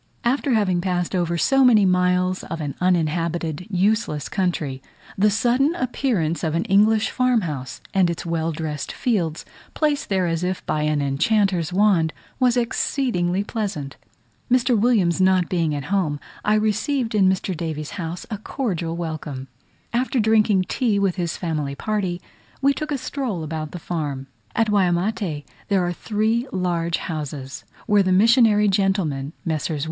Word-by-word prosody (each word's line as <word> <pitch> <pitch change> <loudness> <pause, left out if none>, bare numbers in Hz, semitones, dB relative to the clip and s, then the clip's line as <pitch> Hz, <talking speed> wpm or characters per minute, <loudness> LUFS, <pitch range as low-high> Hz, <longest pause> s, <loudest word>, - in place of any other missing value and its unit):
After 260 +2 +1
having 185 -5 +1
passed 180 -1 -1
over 170 -1 0
so 270 +9 +3
many 225 -5 +6
miles 180 0 +2
of 165 - -5
an 145 -3 -3
uninhabited 170 -1 0
useless 190 -5 0
country, 165 -8 -2 0.3
the 210 +2 +3
sudden 245 - +2
appearance 230 - -1
of 160 -1 0
an 165 - 0
English 215 +3 +3
farm 255 -2 +2
house, 140 -7 -5
and 190 -3 +3
its 170 0 -4
well 165 -1 -1
dressed 150 -2 -4
fields, 175 -10 -1 0.3
placed 295 -2 0
there 190 -2 +1
as 165 0 -1
if 185 +1 -2
by 150 - -1
an 150 -1 +1
enchanter's 180 +4 +1
wand, 180 -4 +3 0.3
was 250 -1 +3
exceedingly 230 -6 0
pleasant. 200 - -4 0.6
Mr. 250 0 +3
Williams 205 -6 +2
not 185 -1 +3
being 165 -4 0
at 145 - -4
home, 155 -7 0 0.2
I 210 - +3
received 225 +4 0
in 195 -3 +4
Mr. 190 0 -1
Davies's 155 -2 -4
house 170 -1 -5
a 210 - -3
cordial 180 - -3
welcome. 150 -5 -5 0.4
After 255 +2 +1
drinking 215 -3 +3
tea 230 -6 +1
with 195 -2 +1
his 170 -3 -2
family 150 -5 -2
party, 190 -2 -2 0.4
we 280 +1 +3
took 305 +2 -5
a 285 - 0
stroll 245 - -3
about 155 0 -4
the 180 - -7
farm. 150 -6 -4 0.3
At 225 - +2
Waimate 180 -4 0 0.2
there 195 -3 +2
are 175 - -1
three 220 +6 0
large 170 -2 0
houses, 145 -5 -6 0.2
where 205 -1 +4
the 185 -1 +1
missionary 215 +1 +5
gentlemen, 190 -8 0
Messrs. 155 -1 -1
185 Hz, 155 wpm, -22 LUFS, 165-215 Hz, 0.6 s, many